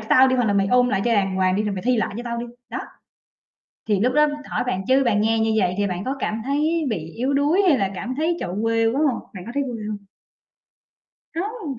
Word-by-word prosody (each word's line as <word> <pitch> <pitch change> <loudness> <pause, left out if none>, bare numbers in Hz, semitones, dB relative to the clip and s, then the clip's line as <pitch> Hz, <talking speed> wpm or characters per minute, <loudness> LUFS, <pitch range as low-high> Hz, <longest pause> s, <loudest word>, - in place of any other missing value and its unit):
cho 220 - -10
tao 260 +1 +7
đi, 260 - +2
hoặc 245 - +2
là 205 - +2
mày 195 -1 +2
ôn 250 +2 +4
lại 195 -5 +1
cho 240 - +2
đàng 195 -3 +1
hoàng 185 0 +2
đi 210 - +1
rồi 210 -2 -2
mày 185 - -5
thi 250 +1 +2
lại 220 - -1
cho 240 - -4
tao 235 0 -3
đi". 240 - -4 0.2
Đó. - - -4 1.1
Thì 205 -2 +2
lúc 250 +3 +2
đó, 300 0 +5 0.2
hỏi - - -1
bạn 190 -6 -1
chứ 265 +1 +4
bạn 215 -4 +2
nghe 225 +1 +2
như 220 0 +1
vậy 180 -2 +1
thì 205 - +2
bạn 185 0 -3
có 265 - -1
cảm 220 -2 -2
thấy 305 +4 0
bị 165 -8 -4
yếu 260 +4 0
đuối 295 +8 +3
hay 285 - +4
là 195 -3 0
cảm 240 +7 -4
thấy, 320 +5 0
trời - - -3
ơi, 180 - -5
quê 225 0 +2
quá 240 +5 +1
hông? 240 - -4
Bạn 180 -2 -8
có - - -6
thấy 280 - +1
quê 240 -5 -5
hông? 205 -1 -6 1.3
Hông! 355 - -4
230 Hz, 270 wpm, -22 LUFS, 205-270 Hz, 1.3 s, tao